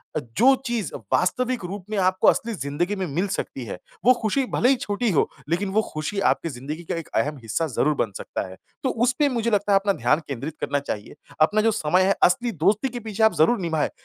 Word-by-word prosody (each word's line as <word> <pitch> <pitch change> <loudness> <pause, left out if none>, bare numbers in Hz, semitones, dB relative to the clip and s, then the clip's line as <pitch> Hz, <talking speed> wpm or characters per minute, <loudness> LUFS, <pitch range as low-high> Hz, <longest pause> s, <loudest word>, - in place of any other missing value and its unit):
अ, - - +1 0.2
जो 265 +4 +6
चीज़ 235 -7 -2 0.2
वास्तविक 245 +4 +1
रूप 190 +1 -6
में 215 - -2
आपको 185 0 +2
असली 230 0 +3
ज़िंदगी 170 +5 -2
में 190 -2 -2
मिल 170 +7 -1
सकती 135 -9 -4
है 100 - -6 0.3
वो 255 - +8
खुशी 245 +5 +1
भले 245 - +3
ही 270 - +5
छोटी 225 0 -1
हो, 155 - +2 0.2
लेकिन 190 +4 0
वो 215 +2 +3
खुशी 155 +6 -3
आपके 165 - -2
ज़िंदगी 145 +6 -6
का 165 - -3
एक 165 - -9
अहम 150 0 0
हिस्सा 155 +9 -1
ज़रूर 150 +2 +1
बन 110 -6 -1
सकता 95 - -5
है। 95 - -10 0.3
तो 265 - +1
उसपे 255 +5 +2
मुझे 235 -2 -1
लगता 205 0 +1
है 195 - +6
अपना 200 0 +1
ध्यान 125 +4 +2
केंद्रित 140 +3 -5
करना 145 - 0
चाहिए। 105 -5 -6 0.3
अपना 210 +7 +4
जो 225 - +3
समय 180 -2 +2
है 195 - +3
असली 235 +7 +3
दोस्ती 215 +8 +3
के 245 - -6
पीछे 220 -1 -2
आप 220 - +5
ज़रूर 200 +10 +4
निभाएँ 160 -4 0
190 Hz, 225 wpm, -24 LUFS, 155-225 Hz, 0.3 s, वो